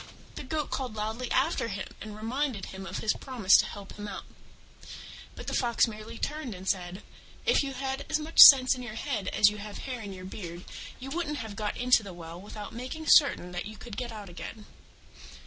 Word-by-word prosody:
The -, -, -7 dB
Goat 295 Hz, +2 st, -3 dB
called 250 Hz, -5 st, -3 dB
loudly 220 Hz, +4 st, -3 dB
after -, -, +1 dB
him -, -, -4 dB, 0.2 s
and 215 Hz, -1 st, -7 dB
reminded 235 Hz, -1 st, -2 dB
him 190 Hz, 0 st, -8 dB
of 185 Hz, -, -5 dB
his 215 Hz, -, +3 dB
promise 235 Hz, -8 st, +3 dB
to -, -, +2 dB
help 200 Hz, -1 st, -9 dB
him 205 Hz, 0 st, -7 dB
out: 205 Hz, -, -6 dB, 1.1 s
but -, -, -9 dB
the -, -, -4 dB
Fox 240 Hz, -1 st, +2 dB
merely 220 Hz, +1 st, -8 dB
turned 300 Hz, -7 st, -4 dB
and 185 Hz, +1 st, -10 dB
said, 180 Hz, -1 st, -2 dB, 0.4 s
"If 480 Hz, -, +4 dB
you 275 Hz, -1 st, -4 dB
had 270 Hz, +1 st, -4 dB
as -, -, +2 dB
much 310 Hz, +1 st, -4 dB
sense 260 Hz, -2 st, +11 dB
in 255 Hz, -, -6 dB
your 240 Hz, -3 st, -7 dB
head 225 Hz, -5 st, -3 dB
as 205 Hz, -1 st, +5 dB
you 210 Hz, -, -8 dB
have 205 Hz, 0 st, -7 dB
hair 255 Hz, -3 st, -5 dB
in 205 Hz, -2 st, -7 dB
your 185 Hz, -1 st, -9 dB
beard 175 Hz, -2 st, -8 dB, 0.3 s
you 270 Hz, +1 st, -7 dB
wouldn't 310 Hz, -2 st, -2 dB
have 220 Hz, -5 st, -6 dB
got 210 Hz, -1 st, -3 dB
into 250 Hz, -1 st, +4 dB
the 200 Hz, -3 st, -9 dB
well 170 Hz, 0 st, -9 dB
without 210 Hz, +1 st, -8 dB
making 255 Hz, +7 st, -6 dB
certain 280 Hz, -, +5 dB
that 180 Hz, +1 st, -4 dB
you 215 Hz, 0 st, -10 dB
could 235 Hz, -2 st, -9 dB
get 245 Hz, 0 st, -4 dB
out 210 Hz, -2 st, -8 dB
again." 205 Hz, +4 st, -9 dB
220 Hz, 215 wpm, -29 LUFS, 200-260 Hz, 1.1 s, sense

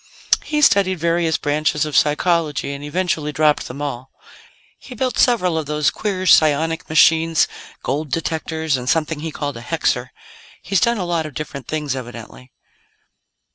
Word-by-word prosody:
He 300 Hz, -1 st, -1 dB
studied 195 Hz, -8 st, +4 dB
various 170 Hz, 0 st, +1 dB
branches 150 Hz, 0 st, 0 dB
of 150 Hz, -, -5 dB
psychology, 150 Hz, -2 st, +1 dB
and 140 Hz, +1 st, -8 dB
eventually 155 Hz, -1 st, -1 dB
dropped 150 Hz, 0 st, +2 dB
them 140 Hz, +4 st, -6 dB
all. 130 Hz, -2 st, -5 dB, 0.7 s
He 255 Hz, -, -11 dB
built 255 Hz, +2 st, -2 dB
several 185 Hz, -10 st, +3 dB
of 155 Hz, -, -5 dB
those 150 Hz, -1 st, +1 dB
queer 195 Hz, -3 st, -3 dB
psionic 160 Hz, -1 st, +3 dB
machines 160 Hz, +1 st, +4 dB, 0.4 s
gold 145 Hz, +3 st, -2 dB
detectors, 160 Hz, -1 st, -1 dB
and 125 Hz, 0 st, -4 dB
something 160 Hz, 0 st, 0 dB
he 160 Hz, +2 st, -4 dB
called 145 Hz, -3 st, -4 dB
a -, -, -8 dB
hexer. 125 Hz, -3 st, -1 dB, 0.5 s
He's 195 Hz, -2 st, +1 dB
done 235 Hz, 0 st, +2 dB
a 185 Hz, -, -2 dB
lot 170 Hz, -2 st, -1 dB
of 145 Hz, -, -12 dB
different 140 Hz, -3 st, -6 dB
things, 150 Hz, -3 st, -2 dB
evidently." 120 Hz, 0 st, -9 dB
155 Hz, 155 wpm, -20 LUFS, 145-170 Hz, 0.7 s, studied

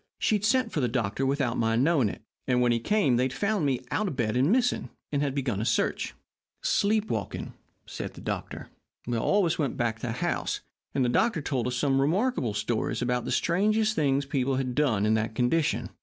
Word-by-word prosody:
She -, -, +1 dB
had 210 Hz, -1 st, +1 dB
sent 230 Hz, +1 st, +2 dB
for -, -, -1 dB
the 125 Hz, -, +2 dB
doctor 120 Hz, +2 st, -1 dB
without 135 Hz, -3 st, 0 dB
my 115 Hz, 0 st, +2 dB
knowing 135 Hz, -2 st, +3 dB
it, -, -, -9 dB, 0.2 s
and 125 Hz, -1 st, +2 dB
when 120 Hz, -1 st, +3 dB
he 115 Hz, -, +2 dB
came 165 Hz, -, +2 dB
they 125 Hz, -, +2 dB
had 130 Hz, -, -3 dB
found 200 Hz, +1 st, 0 dB
me 130 Hz, -3 st, 0 dB
out 215 Hz, -, 0 dB
of 155 Hz, -, -3 dB
bed 110 Hz, -3 st, 0 dB
and 135 Hz, +7 st, +3 dB
missing, 245 Hz, +1 st, +1 dB, 0.2 s
and 145 Hz, -1 st, 0 dB
had 140 Hz, -2 st, -1 dB
begun 125 Hz, -8 st, -1 dB
a -, -, -1 dB
search. -, -, 0 dB, 0.5 s
"'Sleep 215 Hz, +1 st, +2 dB
walking,' 110 Hz, -4 st, -4 dB, 0.3 s
said -, -, -6 dB
the -, -, -10 dB
doctor. -, -, -5 dB, 0.5 s
"All 200 Hz, -, +2 dB
of -, -, +2 dB
us 165 Hz, -, -1 dB
went 140 Hz, -5 st, -1 dB
back 115 Hz, -2 st, 0 dB
to 115 Hz, -, -5 dB
the 115 Hz, -, -2 dB
house, -, -, -2 dB, 0.3 s
and 130 Hz, -, +2 dB
the -, -, +1 dB
doctor 170 Hz, -, +2 dB
told 130 Hz, -4 st, -1 dB
us 125 Hz, -, -2 dB
some 135 Hz, +1 st, +2 dB
remarkable 165 Hz, -, +1 dB
stories 110 Hz, +3 st, -1 dB
about 125 Hz, 0 st, 0 dB
the -, -, -3 dB
strange 215 Hz, +5 st, +2 dB
things 140 Hz, -5 st, +1 dB
people 135 Hz, -1 st, 0 dB
had 130 Hz, -1 st, -1 dB
done 125 Hz, -8 st, +2 dB
while -, -, +2 dB
in -, -, +4 dB
that 110 Hz, 0 st, -1 dB
condition. 145 Hz, +7 st, +1 dB
135 Hz, 225 wpm, -27 LUFS, 120-170 Hz, 0.5 s, in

